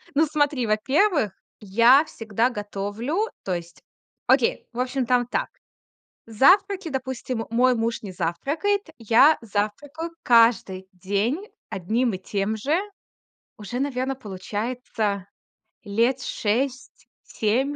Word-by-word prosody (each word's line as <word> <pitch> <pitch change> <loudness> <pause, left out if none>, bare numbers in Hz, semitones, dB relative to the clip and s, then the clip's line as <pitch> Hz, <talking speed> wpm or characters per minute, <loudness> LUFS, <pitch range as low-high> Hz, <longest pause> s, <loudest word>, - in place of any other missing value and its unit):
Ну, 315 - +5
смотри, 290 -5 0
во-первых, 265 - +2 0.3
я 230 +8 +5
всегда 225 -2 -1
готовлю, 215 - -3
то 190 - -2
есть 170 -1 -7 0.5
Окей, - - +2
в 235 - -6
общем, 255 +1 -1
там 245 0 +2
так: - - -2 0.8
завтраки, 370 - +3
допустим, 260 -4 -4
мой 250 +2 +3
муж 230 0 -1
не 200 - -6
завтракает, 310 - -1
я 235 +7 +5
завтракаю 230 +10 -3
каждый 230 -6 +3
день 205 - -2 0.2
одним 220 +5 0
и - - -4
тем 200 +3 -2
же 290 - 0 0.8
уже, 215 +4 -5
наверно, 270 -1 -1
получается 210 -1 -4 0.6
лет 230 +5 +1
6-7 245 +1 -2
235 Hz, 110 wpm, -24 LUFS, 210-275 Hz, 0.8 s, Ну